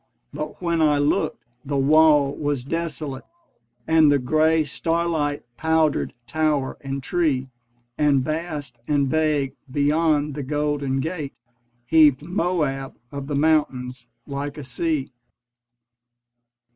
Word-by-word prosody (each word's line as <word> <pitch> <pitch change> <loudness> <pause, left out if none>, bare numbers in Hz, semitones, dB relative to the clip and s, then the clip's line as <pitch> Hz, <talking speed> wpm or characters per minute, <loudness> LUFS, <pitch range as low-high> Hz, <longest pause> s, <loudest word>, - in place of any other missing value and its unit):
But 150 +4 -6
when 170 -1 +1
I 150 -2 +4
looked, 145 +1 0 0.2
the 140 0 -2
wall 145 0 +4
was 145 -4 -2
desolate 155 -3 -4 0.6
And 160 -1 +5
the 145 - +4
grey 155 +4 +2
starlight 160 -1 -1
powdered 160 -1 +1
tower 155 -2 0
and 135 0 -4
tree: 140 -7 0 0.5
And 145 -3 +3
vast 155 -5 -4
and 145 -2 +2
vague 150 -2 +1 0.2
beyond 150 +1 +1
the 145 - -4
Golden 145 -1 -1
Gate 155 -2 -4 0.5
Heaved 150 0 +5
Moab 160 -6 -1 0.2
of 140 -1 -6
the 145 - -2
mountains 130 -5 0 0.2
like 140 +1 -5
a 150 - -6
sea. 135 +2 -2
145 Hz, 115 wpm, -23 LUFS, 140-160 Hz, 0.6 s, And